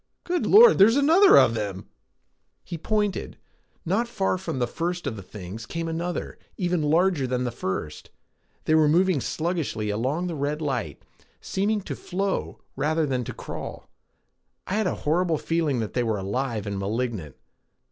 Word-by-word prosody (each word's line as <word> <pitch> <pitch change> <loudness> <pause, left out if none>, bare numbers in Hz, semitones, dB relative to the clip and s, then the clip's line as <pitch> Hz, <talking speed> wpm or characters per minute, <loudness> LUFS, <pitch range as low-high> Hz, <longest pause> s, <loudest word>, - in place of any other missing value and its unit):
"Good 355 0 -1
Lord, 455 - +8
there's 215 +5 +7
another 330 +8 +6
of 115 - +6
them!" 100 -4 -4 0.8
He 175 - -6
pointed. 210 +4 -2 0.5
Not 205 +8 +1
far 195 -5 -1
from 185 - -4
the 125 - +1
first 175 +7 -3
of 135 -6 -2
the 100 - -8
things 100 +3 -9
came 165 +4 -4
another, 170 +2 -4 0.2
even 180 -2 0
larger 160 -1 +2
than 125 0 -1
the 120 - -2
first. 95 -9 -5 0.6
They 155 - +2
were 155 -1 +5
moving 175 -1 +3
sluggishly 155 - -2
along 130 +11 -1
the 175 - -3
red 145 0 -2
light, 125 - -3 0.4
seeming 205 +2 -1
to - - -6
flow 195 +2 -3
rather 155 +3 +1
than 130 -3 -1
to - - -5
crawl. - - -8 0.7
I - - -4
had 215 -1 +1
a - - -1
horrible 165 +1 +2
feeling 155 -6 0
that 110 - -4
they 125 - +1
were 110 -3 0
alive 110 +3 -2
and 100 -1 -3
malignant. 100 - -3
155 Hz, 165 wpm, -25 LUFS, 115-180 Hz, 0.8 s, Lord